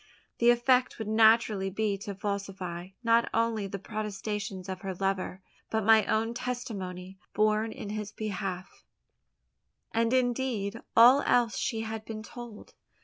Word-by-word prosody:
The 235 - +5
effect 250 +1 +3
would 220 - -5
naturally 220 -2 +4
be 205 +1 -1
to 200 0 -6
falsify, 195 -3 -4 0.2
not 230 0 +3
only 225 -3 +1
the 200 +1 -5
protestations 205 -1 -5
of 185 -1 -5
her 190 -2 -4
lover, 190 0 -2 0.3
but 220 -2 -1
my 220 0 +6
own 225 +1 +1
testimony 195 -7 -5 0.2
borne 215 +1 +2
in 205 - -7
his 210 -1 -4
behalf, 195 -4 -5 1.1
and 230 0 +1
indeed 245 -4 0 0.2
all 250 +5 +8
else 235 -4 +3
she 225 0 -1
had 220 0 -5
been 220 -1 -7
told. 235 -2 -10
215 Hz, 140 wpm, -29 LUFS, 195-230 Hz, 1.1 s, all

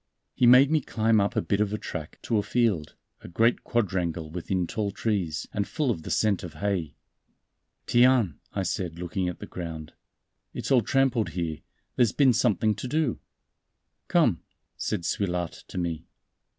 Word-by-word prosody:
He 125 - +3
made 130 +4 +7
me 155 -1 +3
climb 110 -3 +2
up 100 - -1
a - - +1
bit 100 +1 0
of 105 -1 +1
a 105 - -1
track - - -7
to 110 - +1
a - - +2
field, 105 -9 0 0.3
a - - -10
great 115 +7 +2
quadrangle 85 -8 -1
within 90 +1 -2
tall 105 +3 -2
trees, 95 -7 -2
and 100 -1 -1
full 150 -5 0
of 85 - -3
the - - -8
scent 105 -3 +2
of 85 -4 -8
hay. 95 -7 -2 0.9
"Tiens!" 120 - +4 0.2
I 100 - -2
said, 90 -2 -3
looking 90 +1 -2
at 90 - -6
the - - -8
ground, 80 -3 -7 0.6
"it's - - -4
all 130 -3 +6
trampled 125 -4 +1
here; 80 -3 -2 0.4
there's 120 -5 +3
been 135 -4 +4
something 110 -2 +2
to 125 - -5
do." 150 -2 0 0.9
"Come," - - +3 0.3
said 105 -4 -2
Suilhard 90 -2 -1 0.2
to - - -8
me. 85 -3 -3
100 Hz, 170 wpm, -27 LUFS, 85-120 Hz, 0.9 s, made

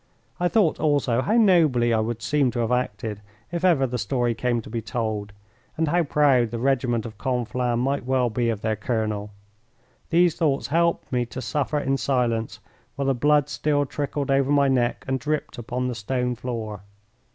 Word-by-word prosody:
I 175 - +2
thought 195 -4 +2
also 145 -6 +2
how 205 - 0
nobly 155 - +4
I 110 - +2
would 115 +1 -3
seem 145 -3 +2
to 120 - -2
have 115 +1 -1
acted 110 -4 -2 0.3
if 175 0 -3
ever 165 -8 +4
the 125 -1 -3
story 120 +3 0
came 120 +1 0
to - - -12
be 115 - -2
told, 110 -2 -3 0.5
and 160 -1 +1
how 175 +3 +3
proud 140 -6 +3
the 120 - -4
regiment 120 -2 0
of 110 -2 -9
Conflans 125 -1 -1
might 135 +3 0
well 125 -2 +1
be 120 +1 0
of 110 -3 -2
their 110 0 0
colonel. 105 -1 -2 0.8
These 170 -1 +3
thoughts 145 -5 +1
helped 170 +3 0
me 125 -2 0
to 125 - -7
suffer 145 +2 -1
in 135 -1 0
silence 115 -6 -1 0.4
while 140 - -2
the 135 - +2
blood 145 +3 +3
still 145 -1 0
trickled 140 0 -3
over 135 0 +2
my 140 -1 +4
neck 125 -3 0
and 130 0 0
dripped 150 -3 -3
upon 125 +2 -3
the 125 - -2
stone 125 +3 -2
floor. 115 -5 -5
125 Hz, 185 wpm, -24 LUFS, 115-145 Hz, 0.8 s, nobly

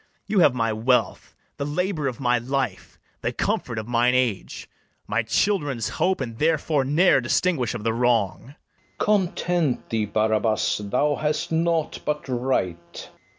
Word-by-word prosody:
You 210 - +1
have 145 -7 +5
my 115 -2 0
wealth, 125 +4 0 0.2
the 140 - -3
labour 155 +1 -1
of 130 0 -4
my 125 -2 +2
life, 130 -5 -3 0.2
The - - -1
comfort 115 - -2
of 110 0 -4
mine 120 +1 +2
age, 120 -7 -1 0.4
my 110 +3 0
children's 140 - 0
hope; 180 0 0
And 115 -3 -5
therefore 155 -2 +1
ne'er 150 +2 +4
distinguish 125 0 0
of 110 - -6
the 115 0 0
wrong. 115 -5 +1
FERNEZE. 135 +4 -16 0.4
Content 175 -7 0
thee, 110 -2 0
Barabas; 110 +1 +1
thou 145 +5 +1
hast 150 +1 -2
naught 165 -1 0
but 150 -1 -3
right. 95 -10 -3
130 Hz, 150 wpm, -24 LUFS, 115-155 Hz, 0.4 s, have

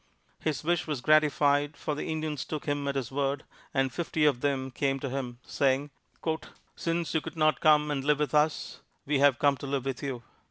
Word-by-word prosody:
His 155 -1 -2
wish 175 +1 +1
was 150 -4 -2
gratified, 145 0 +3
for 155 - -2
the 145 - -4
Indians 155 -3 -2
took 155 -2 -5
him 145 -1 -1
at 140 - -1
his 130 -3 -2
word, 140 0 -1 0.3
and 135 -1 +1
fifty 160 -2 0
of 135 -5 +3
them 135 -2 0
came 135 +2 0
to 135 -1 -4
him, 125 -3 -4
saying, 140 +1 +1 0.8
"Since 165 0 -2
you 160 - +2
could 165 +1 -8
not 155 0 +3
come 150 -1 +5
and 135 -2 -1
live 150 +1 +3
with 150 0 -1
us, 150 0 +1 0.3
we 140 -1 +1
have 140 -3 +5
come 140 0 +3
to 140 - -7
live 135 -1 -1
with 135 -2 -3
you." 130 -4 -4
145 Hz, 205 wpm, -29 LUFS, 135-155 Hz, 0.8 s, come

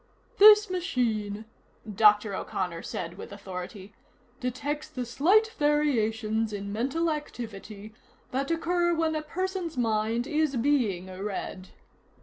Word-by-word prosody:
"This 420 +1 +9
machine," 230 - -1 0.4
Dr. 210 0 +4
O'Connor 180 -3 -3
said 175 +2 -6
with - - -8
authority, 195 +1 -8 0.5
"detects 285 +5 -3
the 255 -5 -5
slight 390 - +3
variations 225 -7 +1
in 200 -1 -5
mental 275 +9 0
activity 215 -7 -7 0.4
that 275 +3 -1
occur 345 +1 +1
when 320 -1 +1
a 310 - -1
person's 365 0 -3
mind 225 0 0
is 305 -1 0
being 230 -8 +1
read." 190 0 -6
240 Hz, 115 wpm, -28 LUFS, 210-310 Hz, 0.5 s, This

